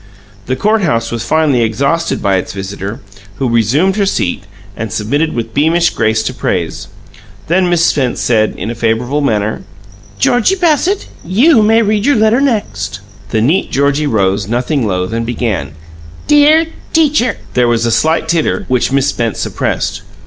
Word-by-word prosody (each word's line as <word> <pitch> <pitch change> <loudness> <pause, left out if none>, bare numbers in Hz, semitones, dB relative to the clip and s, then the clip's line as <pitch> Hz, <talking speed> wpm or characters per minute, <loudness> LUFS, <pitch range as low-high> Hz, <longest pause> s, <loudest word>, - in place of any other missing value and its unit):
The 130 - 0
court 215 +9 +1
house 115 -10 0
was 115 -1 -3
finally 145 -1 +2
exhausted 140 +9 -1
by 100 -2 +2
its 90 - -4
visitor, 100 +4 -6 0.3
who 130 - -2
resumed 125 - +1
her 200 - +2
seat 95 - -1 0.3
and 110 -1 -5
submitted 135 +9 -1
with 115 -1 -4
beamish 165 +3 +2
grace 110 0 0
to 130 - -3
praise. 85 -9 -3 0.6
Then 180 +2 +1
Miss 170 -1 +2
Spence 130 -4 0
said, 110 -3 +1
in 105 +6 -4
a - - -3
favourable 120 +5 -1
manner: 110 -5 -1 0.6
"Georgie 245 - +2
Bassett, 355 +2 +1 0.2
you 230 - +4
may 225 +2 +4
read 210 +2 0
your 285 - +4
letter 220 +3 +3
next." 105 - -2 0.3
The 110 - 0
neat 155 - +1
Georgie 140 +2 +1
rose, 100 -4 0
nothing 125 +2 -1
loath, 90 +1 -2
and 115 0 -1
began: 115 -8 -3 0.5
"'Dear 300 +2 +5 0.3
Teacher 295 -7 +2
'" - - -22
There 125 -1 +2
was 120 0 +1
a 115 - +1
slight 160 +5 +1
titter, 165 -1 0
which 125 0 +1
Miss 135 0 +2
Spence 115 -5 -2
suppressed. - - -2
130 Hz, 165 wpm, -14 LUFS, -, 0.6 s, Dear